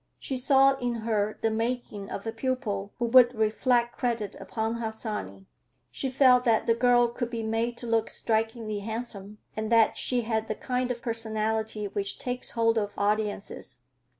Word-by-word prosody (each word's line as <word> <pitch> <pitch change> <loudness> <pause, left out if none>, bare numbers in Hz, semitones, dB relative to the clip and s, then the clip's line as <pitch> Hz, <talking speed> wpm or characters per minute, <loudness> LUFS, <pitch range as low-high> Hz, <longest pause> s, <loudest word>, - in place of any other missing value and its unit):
She 270 - -4
saw 270 +1 +4
in 245 -2 -2
her 215 -2 0
the 225 - +2
making 225 -3 -3
of 200 - -6
a 225 - -2
pupil 225 -5 -2
who 240 - 0
would 245 +1 +6
reflect 235 +2 +1
credit 230 -5 -1
upon 225 0 -3
Harsanyi. 215 - -5 0.5
She 270 - -3
felt 255 -1 +5
that 230 -3 +2
the 230 - +4
girl 240 0 +4
could 240 0 -4
be 230 -2 -4
made 225 +2 -1
to 240 - -6
look 225 -1 +1
strikingly 220 -1 -1
handsome, 215 -1 -5 0.2
and 220 +1 -3
that 230 -1 +4
she 250 -1 +1
had 220 -1 -1
the 215 - -2
kind 250 +1 -2
of 240 -1 -4
personality 220 -2 -1
which 200 0 -3
takes 250 0 -2
hold 230 0 +3
of 205 -1 -4
audiences. 205 - -2
225 Hz, 170 wpm, -27 LUFS, 215-245 Hz, 0.5 s, would